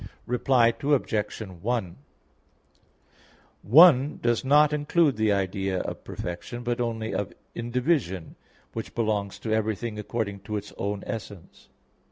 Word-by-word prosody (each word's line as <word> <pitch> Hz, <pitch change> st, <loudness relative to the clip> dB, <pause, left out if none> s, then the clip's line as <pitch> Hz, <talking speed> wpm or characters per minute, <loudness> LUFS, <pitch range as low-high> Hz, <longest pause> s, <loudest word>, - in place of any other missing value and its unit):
Reply 125 Hz, -1 st, +3 dB
Obj. 125 Hz, -7 st, 0 dB
1: 95 Hz, 0 st, -3 dB, 1.7 s
"One" 145 Hz, -, +6 dB
does 120 Hz, -1 st, +1 dB
not 150 Hz, +2 st, +5 dB
include 150 Hz, 0 st, +2 dB
the 110 Hz, 0 st, +2 dB
idea 95 Hz, -1 st, -1 dB
of -, -, -6 dB
perfection, 105 Hz, +7 st, -6 dB
but 120 Hz, 0 st, -1 dB
only 115 Hz, -2 st, -2 dB
of 105 Hz, -, -3 dB, 0.2 s
indivision, 120 Hz, -, -1 dB, 0.4 s
which 115 Hz, -, -6 dB
belongs 105 Hz, -4 st, -1 dB
to 110 Hz, -, -3 dB
everything 110 Hz, 0 st, -1 dB
according 105 Hz, -2 st, -3 dB
to 105 Hz, +1 st, -4 dB
its 105 Hz, 0 st, -8 dB
own 100 Hz, 0 st, -2 dB
essence. 100 Hz, -5 st, -8 dB
110 Hz, 120 wpm, -26 LUFS, 100-125 Hz, 1.7 s, One